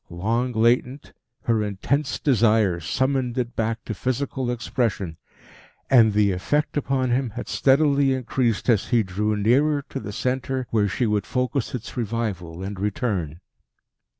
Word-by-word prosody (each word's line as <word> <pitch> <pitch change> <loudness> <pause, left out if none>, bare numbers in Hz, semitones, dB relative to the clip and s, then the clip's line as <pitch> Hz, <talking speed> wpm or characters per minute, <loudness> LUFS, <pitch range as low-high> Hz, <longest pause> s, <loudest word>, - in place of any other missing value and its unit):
Long 115 +8 -1
latent, 120 +4 +1 0.3
her 115 -3 +1
intense 115 +8 -1
desire 110 - +3
summoned 130 - -1
it 120 -1 -2
back 115 +1 -2
to 110 - -3
physical 130 +2 -2
expression; 115 -7 -2 0.7
and 115 -5 +6
the 105 -1 +3
effect 145 +12 -1
upon 135 -3 0
him 125 0 +1
had 115 +3 -7
steadily 140 0 +3
increased 125 -3 -1
as 115 -5 +3
he 120 -3 +3
drew 105 +3 -1
nearer 140 +8 +2
to 135 - -4
the 105 -3 -6
centre 130 +3 -2
where 105 -2 +2
she 120 +5 -1
would 105 -2 0
focus 130 0 -1
its 120 -2 -7
revival 100 -7 -3
and 100 0 -5
return. 100 - -2
115 Hz, 145 wpm, -24 LUFS, 105-130 Hz, 0.7 s, and